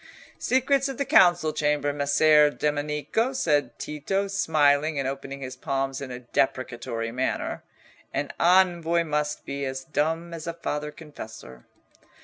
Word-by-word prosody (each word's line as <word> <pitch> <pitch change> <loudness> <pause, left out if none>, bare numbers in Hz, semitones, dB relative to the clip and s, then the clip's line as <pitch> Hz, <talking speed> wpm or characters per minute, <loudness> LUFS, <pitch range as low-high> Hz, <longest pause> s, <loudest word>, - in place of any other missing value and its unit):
"Secrets 270 +2 +2
of 270 - -5
the 280 - -1
council 175 -7 +5
chamber, 150 -1 0
Messer 150 +1 +5
Domenico!" 150 - -1
said 150 - 0
Tito, 195 +7 -2
smiling 155 -5 +2
and 135 -1 -1
opening 135 0 -5
his 130 -1 -6
palms 135 0 -2
in 140 - -6
a 125 0 -7
deprecatory 120 -2 -2
manner. 130 +2 -2 0.5
"An - - -2
envoy 170 -2 +4
must 150 -1 -2
be 140 0 -4
as 130 0 -4
dumb 160 +4 -1
as 165 -1 -7
a 170 - -2
father 150 -3 -3
confessor." 110 - -11
150 Hz, 135 wpm, -26 LUFS, 135-170 Hz, 0.5 s, council